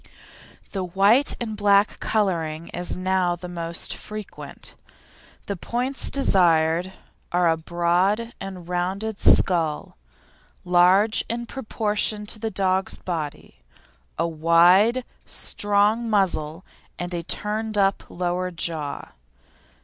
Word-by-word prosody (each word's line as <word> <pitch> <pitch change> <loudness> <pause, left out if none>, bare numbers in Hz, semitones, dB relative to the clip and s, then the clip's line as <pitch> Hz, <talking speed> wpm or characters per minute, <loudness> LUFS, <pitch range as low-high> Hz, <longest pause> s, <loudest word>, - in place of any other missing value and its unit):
The 190 -2 -3
white 200 +9 +3
and 220 -3 -4
black 205 0 +3
colouring 170 -6 -1
is 175 +1 -3
now 185 -1 +1
the 180 +1 -9
most 170 -1 -3
frequent. 215 -1 -9 0.7
The 200 - -3
points 250 +8 -1
desired 175 -7 +2 0.4
are 175 0 +2
a 165 - +3
broad 175 +7 0
and 185 -3 -7
rounded 190 +4 -2
skull, 165 -5 +2 0.7
large 180 +5 +4
in 235 +1 -3
proportion 215 -4 -1
to 215 +1 -2
the 225 0 -2
dog's 190 -2 0
body; 160 -5 -6 0.6
a 165 - +1
wide, 175 +9 +4 0.2
strong 210 +3 0
muzzle 180 -5 0 0.3
and 175 0 -5
a 170 - -2
turned 215 +5 -3
up 195 0 +2
lower 180 +1 -2
jaw. 165 -4 -4
185 Hz, 110 wpm, -23 LUFS, 170-210 Hz, 0.7 s, large